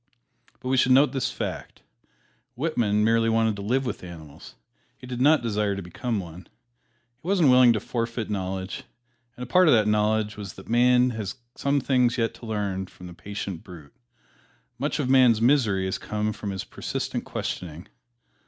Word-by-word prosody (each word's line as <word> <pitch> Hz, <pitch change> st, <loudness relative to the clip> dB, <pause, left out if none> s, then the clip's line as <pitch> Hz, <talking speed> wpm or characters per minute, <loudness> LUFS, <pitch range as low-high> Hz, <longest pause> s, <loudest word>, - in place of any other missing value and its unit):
But 130 Hz, -, -5 dB
we 130 Hz, -, +2 dB
should 130 Hz, 0 st, +4 dB
note 135 Hz, 0 st, +5 dB
this 130 Hz, -1 st, -1 dB
fact: -, -, -6 dB, 0.7 s
Whitman 120 Hz, -8 st, +1 dB
merely 115 Hz, +1 st, +3 dB
wanted 110 Hz, -1 st, +2 dB
to -, -, -6 dB
live 130 Hz, +6 st, 0 dB
with 125 Hz, -, -4 dB
animals 80 Hz, -5 st, -11 dB, 0.4 s
he -, -, -12 dB
did 125 Hz, -1 st, -5 dB
not 145 Hz, -1 st, +5 dB
desire 105 Hz, -3 st, 0 dB
to 100 Hz, -, -5 dB
become 110 Hz, +6 st, -3 dB
one. 90 Hz, 0 st, -9 dB, 0.7 s
He 165 Hz, -, -11 dB
wasn't 180 Hz, -8 st, +4 dB
willing 125 Hz, -1 st, +7 dB
to 110 Hz, -, -1 dB
forfeit 115 Hz, +1 st, -3 dB
knowledge; 95 Hz, +4 st, -4 dB, 0.5 s
and 125 Hz, -, -6 dB
a -, -, -4 dB
part 180 Hz, +8 st, +4 dB
of 150 Hz, -, +7 dB
that 105 Hz, -2 st, +3 dB
knowledge 105 Hz, 0 st, +1 dB
was 100 Hz, -4 st, -7 dB
that 95 Hz, -, -13 dB
man 125 Hz, +1 st, +4 dB
has 110 Hz, -2 st, -5 dB, 0.2 s
some 140 Hz, 0 st, 0 dB
things 125 Hz, -3 st, +2 dB
yet 115 Hz, -1 st, 0 dB
to 115 Hz, -, -11 dB
learn 100 Hz, -3 st, -2 dB
from 90 Hz, -, -14 dB
the 90 Hz, -, -9 dB
patient 100 Hz, 0 st, -6 dB
brute. 85 Hz, -8 st, -13 dB, 0.9 s
Much 145 Hz, +3 st, -1 dB
of 145 Hz, -5 st, -1 dB
man's 130 Hz, -4 st, +5 dB
misery 115 Hz, -6 st, +2 dB
has 95 Hz, -, -2 dB
come 105 Hz, 0 st, -2 dB
from 105 Hz, -, -6 dB
his 95 Hz, -1 st, -4 dB
persistent -, -, -4 dB
questioning. 85 Hz, 0 st, -5 dB
110 Hz, 180 wpm, -25 LUFS, 100-125 Hz, 0.9 s, willing